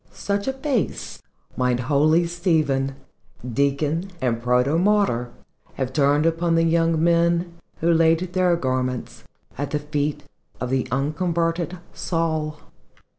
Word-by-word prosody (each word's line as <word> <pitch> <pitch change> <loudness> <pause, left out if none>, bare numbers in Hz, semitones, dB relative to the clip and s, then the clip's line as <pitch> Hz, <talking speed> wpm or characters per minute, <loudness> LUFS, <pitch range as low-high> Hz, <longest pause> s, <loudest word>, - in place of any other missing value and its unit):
Such 200 +2 -2
a 265 - 0
face 265 -3 -2 0.3
might 125 -1 +1
holy 155 +6 +3
Stephen, 155 -6 0 0.5
Deacon 140 - 0
and 120 -3 -1
Protomartyr, 130 - +2 0.5
have 130 -1 -3
turned 145 +2 +3
upon 165 0 +1
the 165 - +3
young 165 -1 +2
men 170 0 +2 0.3
who 170 +1 +3
laid 165 0 +4
their 180 -2 +3
garments 130 -4 -3 0.3
at 145 -1 -2
the 150 - -1
fee 150 0 -2 0.4
of 125 - -3
the 130 -1 0
unconverted 165 +5 -1 0.2
Saul. 160 -3 -2
160 Hz, 120 wpm, -23 LUFS, 135-170 Hz, 0.5 s, laid